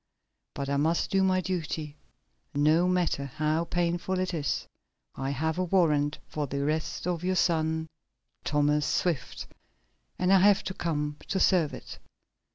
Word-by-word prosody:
But 140 - -3
I 140 0 0
must 160 +4 +1
do 195 - +3
my 185 -1 +2
duty, 160 -5 -3 0.6
no 155 +5 +4
matter 175 -6 0
how 155 +4 -1
painful 175 +2 -1
it 185 0 -1
is. 145 -4 -1 0.5
I 135 0 -3
have 160 +5 -1
a - - +2
warrant 150 -5 +2
for 150 -2 -3
the 140 +1 -2
arrest 155 +2 -2
of 175 -1 -2
your 185 +1 +1
son, 160 -2 +1 0.6
Thomas 150 0 +2
Swift, 165 -8 -1 0.7
and 185 +1 +3
I 195 - +7
have 200 +1 +5 0.2
come 150 -3 -2
to 190 - -1
serve 175 -6 +3
it. - - -10
160 Hz, 150 wpm, -28 LUFS, 150-180 Hz, 0.7 s, I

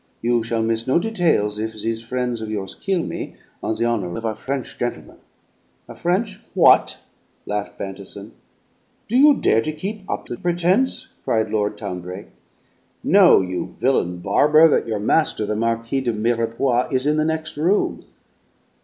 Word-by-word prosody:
You 120 0 +2
shall 115 0 -1
miss 115 +1 -1
no 130 - +3
details 170 - +1
if 110 +1 -3
these 110 +1 -3
frien's 125 0 -3
of 110 - -5
yours 100 -3 -4
kill 190 -4 -1
me, - - -6 0.3
on 110 - -1
the 115 - 0
honor 100 -7 -1
of 115 - -5
a 110 - 0
French 135 +4 -5
gentleman." 120 - -4 0.7
"A - - -9
French 190 +4 -1 0.2
what?" 180 - +5 0.5
laughed 105 0 -4
Bantison. 100 +2 -7 0.8
"Do 235 - -2
you 290 +2 +7
dare 115 - +2
keep 190 - -5
up - - -3
the 120 - -6
pretense?" 175 - 0
cried 110 -1 0
Lord 105 -1 -1
Town 100 -4 -5
brake. 90 +3 -8 0.7
"Know, - - +6
you 90 -1 -4
villain 90 -9 +1
barber, 150 - +5
that - - +1
your 110 -2 -1
master, 110 +1 +1
the 105 +1 -2
Marquis 115 +4 -1
de 120 -3 -1
Mirepoix, 115 +3 0
is 130 0 0
in 150 +1 +2
the 155 - +2
next 160 0 -2
room." 175 +8 0
115 Hz, 160 wpm, -21 LUFS, 105-155 Hz, 0.8 s, you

